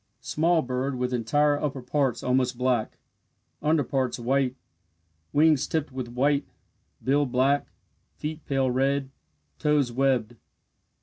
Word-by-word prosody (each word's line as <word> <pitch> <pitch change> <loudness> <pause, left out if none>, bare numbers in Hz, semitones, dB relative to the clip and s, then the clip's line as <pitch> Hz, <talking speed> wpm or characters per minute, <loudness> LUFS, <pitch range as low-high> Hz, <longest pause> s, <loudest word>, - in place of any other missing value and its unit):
Small 165 +1 +2
bird 130 +2 -2
with 125 0 -2
entire 145 +5 +2
upper 135 -3 -3
parts 135 -2 0
almost 125 -1 +1
black 125 -3 0 0.6
under 155 0 +2
parts 130 0 -1
white 130 +1 0 0.8
wings 150 -2 +4
tipped 155 -3 -2
with 130 -2 -5
white, 140 +4 +1 0.6
bill 140 +2 +2
black 135 +3 +2 0.5
feet 155 0 -5
pale 135 -2 +1
red 135 +1 0 0.5
toes 150 -4 +2
webbed. 120 -3 +1
135 Hz, 120 wpm, -26 LUFS, 125-145 Hz, 0.8 s, wings